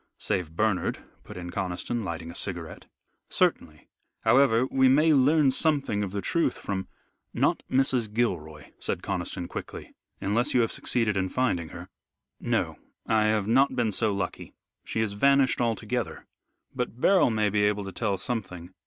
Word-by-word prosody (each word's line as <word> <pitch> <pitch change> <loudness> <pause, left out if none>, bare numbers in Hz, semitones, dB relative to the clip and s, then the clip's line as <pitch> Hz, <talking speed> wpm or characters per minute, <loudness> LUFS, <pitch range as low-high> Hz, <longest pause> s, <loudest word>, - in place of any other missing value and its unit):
"Save 90 -6 -2
Bernard," 105 -1 0 0.2
put - - -10
in 90 -1 -6
Conniston, 95 +5 -3
lighting 85 -2 -5
a - - -11
cigarette. 85 -5 -5 0.4
"Certainly. 75 -1 0 0.3
However, 130 -3 +4
we 130 -1 +4
may 155 +4 +5
learn 140 +1 +4
something 140 -8 +1
of 100 - -3
the 100 -1 -4
truth 170 - +1
from 95 -2 -4 0.3
" - - -51
"Not - - +1
Mrs. 130 -4 +1
Gilroy," 80 - -2
said - - -3
Conniston 85 - -3
quickly, - - -8 0.3
"unless 120 +9 0
you 125 - +5
have 115 - 0
succeeded 115 -4 -1
in 95 0 0
finding 90 -11 0
her." 85 +1 -9 0.5
"No, - - -1 0.3
I 110 -1 +2
have 110 -2 +1
not 130 +6 +3
been 115 -3 +1
so 110 +2 +1
lucky. 100 -2 -4 0.3
She 110 - -2
has 110 -2 0
vanished 140 +4 +3
altogether. 115 +1 -2 0.5
But 125 -1 -4
Beryl 190 -1 +4
may 110 -2 +1
be 105 0 +1
able 105 0 +1
to 95 - -6
tell 100 +1 -1
something." 95 -5 -4
110 Hz, 160 wpm, -27 LUFS, 95-125 Hz, 0.5 s, may